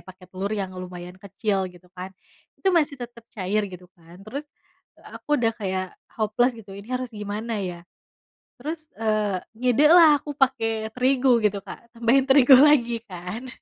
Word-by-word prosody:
pake 185 0 -13
telur 190 +2 -3
yang 195 -3 -4
lumayan 180 -1 -8
kecil, 200 -1 -2
gitu 180 0 -19
kan. 185 +1 -7 0.4
Itu 385 - 0
masih 305 -4 +2
tetep 235 -1 -9
cair, 205 +1 -1
gitu 180 0 -11
kan. 170 +2 -17
Terus, 280 +7 -6 0.7
aku 295 0 -1
udah 225 -1 +2
kayak 190 -3 -2 0.3
hopeless, 225 +3 +1
gitu. 205 -3 -12
Ini 200 +3 -11
harus 255 -1 -5
gimana 210 +2 -4
ya? 175 -3 -5 0.8
Terus, 310 +3 -6
eee, 215 -4 0 0.2
ngide 250 +4 +3
lah, 310 -4 +7
aku 295 - -7
pake 225 -5 0
terigu, 255 -1 +3
gitu 205 -1 +1
Kak. 235 - -12
Tambahin 240 +3 +3
terigu 265 -1 +8
lagi 240 -6 +4
kan. 185 +6 -7
220 Hz, 160 wpm, -24 LUFS, 190-255 Hz, 0.8 s, terigu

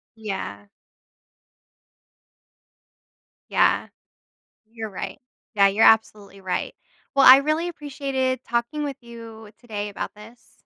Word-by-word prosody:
Yeah. 190 - -6 2.8
Yeah. - - +2 0.8
You're 225 -1 -7
right. 195 - -7 0.4
Yeah, 200 -1 +6
you're 205 +3 +3
absolutely 210 -3 +2
right. 185 -1 -3 0.4
Well, 275 - +5
I 260 +1 +11
really 310 +4 0
appreciated 275 -5 -3
talking 235 +6 -2
with 280 -2 -4
you 230 -2 -12
today 210 -4 -5
about 200 - -6
this. 230 +3 -16
230 Hz, 100 wpm, -23 LUFS, 210-265 Hz, 2.8 s, I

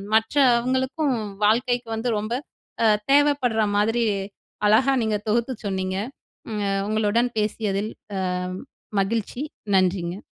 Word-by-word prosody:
மற்றவங்களுக்கும் 260 +3 +2 0.3
வாழ்க்கைக்கு 245 +2 +2
வந்து 230 +2 -1
ரொம்ப 215 +3 -3 0.5
அ, - - +6 0.2
தேவைப்படுற 280 -6 +3 0.2
மாதிரி, 225 +3 +2 0.6
அழகா 245 +6 +4
நீங்க 215 -1 +1
தொகுத்து 235 +4 +1
சொன்னீங்க. 190 -1 -2 0.5
ம் 210 -1 -2
அ - - 0 0.2
உங்களுடன் 220 +3 +2
பேசியதில் 210 0 -1 0.3
அ, - - -1 0.8
மகிழ்ச்சி. 225 +5 -2 0.3
நன்றிங்க. 185 0 0
225 Hz, 105 wpm, -24 LUFS, 210-245 Hz, 0.8 s, அ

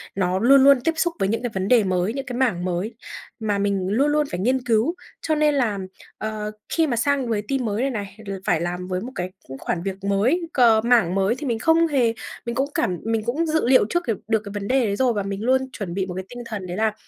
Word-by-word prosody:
nó 185 -1 0
luôn 265 +4 +6
luôn 275 -2 +6
tiếp 330 - +2
xúc 345 +1 +1
với 195 - +1
những 225 +3 -1
cái 245 - -1
vấn 190 0 -2
đề 240 -2 +5
mới, 185 +2 0
những 275 0 -4
cái 245 -1 -5
mảng 220 -9 +1
mới 185 +5 -2 0.4
mà 210 -2 0
mình 200 -2 0
luôn 260 +8 +2
luôn 300 0 +2
phải 175 - -3
nghiên 255 +6 +1
cứu, 235 +8 +2 0.3
cho 310 - 0
nên 300 -1 +3
là, 225 -7 0 0.4
ờ, 215 -1 -4 0.2
khi 325 -1 +2
mà 250 - 0
sang 275 +1 +1
với 210 -2 0
team 270 -2 0
mới 210 +1 -1
này 270 - +1
này 205 -3 -6
l - - -3
phải 165 - +2
làm 180 +1 -3
với 185 0 -2
một 245 +5 -6
cái 180 +1 -3 0.2
cũng 135 +1 -8
khoản 170 +5 -3
việc 195 0 -5
mới, 205 - +2
cờ 230 -4 +5
mảng 230 -7 +3
mới 195 +4 +2
thì 290 +1 -6
mình 230 -2 -1
không 325 +5 +4
hề 255 -7 +2 0.3
mình 235 0 -3
cũng 270 +3 0
cảm 180 - 0
mình 225 -1 0
cũng 285 +8 0
dự 315 -5 +1
liệu 255 -5 +5
trước 345 0 0
cái 225 - +1
được 220 -1 +2
cái 200 - -7
vấn 205 -1 -4
đề 260 -2 +2
đấy 200 - 0
rồi 250 +1 +2
và 205 -2 -1
mình 195 0 -4
luôn 260 +2 +3
chuẩn 185 -5 -5
bị 190 +1 -1
một 185 - -6
cái 185 0 -5
tinh 245 - -9
thần 210 -5 -5
đấy 175 +1 -5
là 220 -1 +1
225 Hz, 270 wpm, -23 LUFS, 195-260 Hz, 0.4 s, luôn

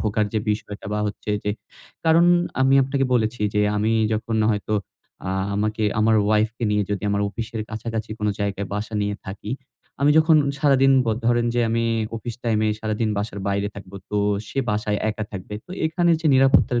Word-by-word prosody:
ভোগার 105 0 0
যে 110 - +1
বিষয়টা 105 -1 -4
বা 105 - -1
হচ্ছে। 105 +1 -5
যে 105 - +1 0.5
কারণ 165 +1 +5 0.4
আমি 135 +1 +4
আপনাকে 135 +1 0
বলেছি 110 -1 0
যে 105 - +3 0.2
আমি 110 +2 +1 0.2
যখন 110 +1 -1
হয়তো 105 0 -1 0.5
আ - - -1 0.2
আমাকে 110 +2 -1 0.2
আমার 110 +1 +4
ওয়াইফ 110 +1 +3
কে 120 - -3
নিয়ে 105 0 +2
যদি 100 - -2
আমার 100 0 +1
অফিসের 110 +1 -5
কাছাকাছি 110 0 -4
কোন 105 - -1
জায়গায় 100 -1 -2
বাসা 110 +2 -4
নিয়ে 105 0 -1
থাকি। 100 +2 -7 0.5
আমি 145 +1 +4
যখন 160 0 +5 0.2
সারাদিন 135 -1 +4
ব - - -8 0.2
ধরেন 120 0 +3
যে 120 - +2
আমি 115 0 +1 0.3
অফিস 115 +1 -6
টাইম 115 -2 +1
এ - - +2
সারাদিন 110 +1 -1
বাসার 100 0 -3
বাইরে 100 +1 0
থাকব। 100 -1 -11 0.2
তো 105 - 0 0.3
সে - - -5
বাসায় 105 0 -1
একা 110 0 -4
থাকবে। 95 +1 -7
তো - - -17 0.2
এখানে 170 +2 +1
যে 165 - -1
নিরাপত্তার 130 -2 +4
110 Hz, 185 wpm, -23 LUFS, 105-120 Hz, 0.5 s, কারণ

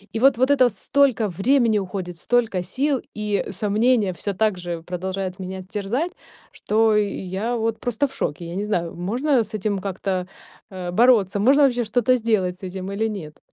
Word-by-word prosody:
И - - 0
вот 265 0 +5
вот 260 +3 +3
это 255 -3 +5
столько 240 +1 +1
времени 220 - +2
уходит, 180 -3 -5
столько 225 -6 +1
сил 270 +7 0 0.2
и 210 -1 -1
сомнения 210 +1 +2
всё 200 +4 -3
также 180 -5 -1
продолжают 185 +1 -4
меня 185 0 -6
терзать, 230 - -2 0.4
что 220 0 +2
я 205 +2 -2
вот 225 0 -1
просто 245 +3 0
в - - -15
шоке. 170 +3 -3
Я 170 +2 -6
не 200 - -2
знаю, 175 -5 -2
можно 240 - +1
с 215 +1 -5
этим 200 -1 -1
как-то, 190 -1 -3 0.5
э, 180 -2 -5
бороться, 210 -2 +4
можно 280 +6 +5
вообще 245 -3 +3
что-то 245 +3 +2
сделать 195 -6 0
с - - -21
этим 190 +1 -6
или 220 +3 -1
нет. 160 -8 -7
210 Hz, 175 wpm, -22 LUFS, 185-240 Hz, 0.5 s, вот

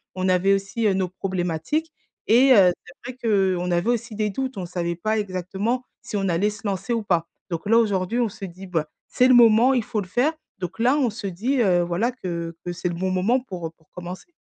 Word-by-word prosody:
on 185 0 0
avait 185 +2 +3
aussi, 195 +4 -1
heu, 195 - +3
nos 190 -1 0
problématiques 185 - -2 0.4
et 255 +4 +6
heu, 190 -6 +7
c'est 240 +8 -10
vrai 250 - -24
qu'on 190 -5 +1
avait 175 +6 +1
aussi 235 -2 -1
des 210 0 0
doutes, 265 +2 -4
on 185 - -3
savait 170 -1 -3
pas 215 +6 -1
exactement 200 +5 -2 0.2
si - - -7
on 195 - 0
allait 180 +5 +2
se 210 +1 -10
lancer 200 +4 -2
ou 230 - -1
pas. 170 -4 +1 0.2
Donc 170 +3 -4
là 225 - +6
aujourd'hui 205 0 +1
on 235 -2 +1
se 195 - -8
dit, 185 +1 -10
bah,: 160 -4 -1 0.2
«C'est 250 - +4
le - - +7
moment, 240 +2 +6
il 245 - +1
faut 235 -4 -2
le 185 - -8
faire». 250 - +1 0.3
Donc 180 +3 -6
là, 250 +5 +3
on 265 -5 +2
se 210 -1 -5
dit 230 +9 -1
heu, 180 -4 +3
voilà, 175 +8 0
que 170 -7 -5
que 175 - -2
c'est 175 +1 -3
le 175 - -3
bon 185 +2 -1
moment 200 +8 +2
pour, 185 -10 -6
heu, - - -8
pour 160 - -31
commencer. 180 - -9
195 Hz, 235 wpm, -23 LUFS, 180-235 Hz, 0.4 s, heu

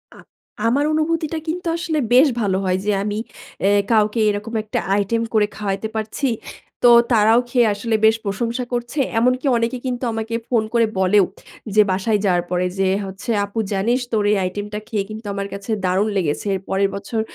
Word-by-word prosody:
আ - - -15 0.5
আমার 280 +5 +2
অনুভূতিটা 315 0 0
কিন্তু 350 +2 -3
আসলে 330 -3 -1
বেশ 260 +5 +7
ভালো 195 -3 +1
হয় 185 0 +1
যে 210 - +2
আমি 205 0 -2 0.5
এ - - +5 0.2
কাউকে 215 0 +3
এইরকম 210 +2 -2
একটা 215 - -2 0.2
আইটেম 205 +3 0
করে 210 -2 +3
খাওয়াইতে 205 +1 -2
পারছি। 220 +6 -2 0.6
তো 240 - +8 0.2
তারাও 220 +1 +5
খেয়ে 240 -2 +3
আসলে 220 +2 -1
বেশ 220 0 +5
প্রশংসা 230 +5 -2
করছে। 240 +4 -3 0.2
এমনকি 250 +3 +1
অনেকে 230 +2 -1
কিন্তু 250 0 -3
আমাকে 225 +1 -3
ফোন 230 -3 +2
করে 230 -1 +4
বলেও 190 +1 +4 0.5
যে 215 - +7
বাসায় 205 +3 +1
যাওয়ার 175 -2 +2
পরে 180 0 +1
যে 195 - +3 0.2
হচ্ছে, 190 +5 -5
"আপু 205 +3 -5
জানিস 230 +6 +1
তোর 215 -2 +1
এই 210 - +3
আইটেমটা 205 +3 -4
খেয়ে 210 -3 -1
কিন্তু 215 +1 -8
আমার 200 0 -3
কাছে 200 +3 -6
দারুণ 190 +3 +2
লেগেছে। 170 +2 -1
এর 190 - -4
পরের 195 +1 +1
বছর 200 +3 -3
215 Hz, 180 wpm, -20 LUFS, 200-240 Hz, 0.6 s, তো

